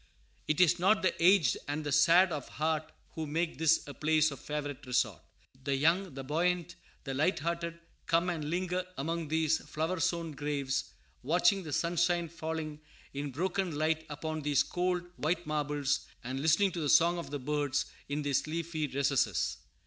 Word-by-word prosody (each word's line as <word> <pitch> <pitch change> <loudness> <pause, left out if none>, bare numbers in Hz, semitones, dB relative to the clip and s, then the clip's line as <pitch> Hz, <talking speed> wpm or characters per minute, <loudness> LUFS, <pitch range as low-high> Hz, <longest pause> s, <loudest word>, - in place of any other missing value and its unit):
It 155 - +1
is 180 -1 +5
not 195 +4 +3
the 185 - +3
aged 175 -7 +5
and 145 +2 -2
the 145 - -3
sad 170 +6 +5
of 145 -4 -4
heart 155 0 -1 0.2
who 160 -3 -4
make 165 +2 -2
this 160 0 +4
a 145 - -7
place 155 0 +2
of 140 - -8
favorite 145 -1 -5
resort. 110 -8 0 0.4
The 140 0 0
young, 165 +4 +2
the 135 - -5
buoyant, 170 +4 0 0.3
the 135 - -4
light 155 +8 +2
hearted, 170 +1 -3 0.3
come 170 +2 +2
and 165 -4 -2
linger 180 +1 -1
among 165 +3 -2
these 160 0 +2
flower 160 +4 -3
sown 165 +1 0
graves, 140 -2 -2 0.4
watching 175 +7 +3
the 160 -4 -7
sunshine 170 +2 +1
falling 160 -2 -5 0.3
in 140 +1 -3
broken 180 +4 -1
light 155 +1 0
upon 155 +1 -4
these 145 -1 +3
cold, 180 0 -1
white 160 +4 -1
marbles, 145 -2 -1 0.2
and 130 +2 -4
listening 160 +7 +3
to 170 - -4
the 150 - 0
song 170 +3 +5
of 170 - -6 0.2
birds 145 -1 0 0.2
in 145 +1 -2
these 140 0 0
leafy 160 -1 -2
recesses. 135 - +1
155 Hz, 170 wpm, -31 LUFS, 145-170 Hz, 0.4 s, is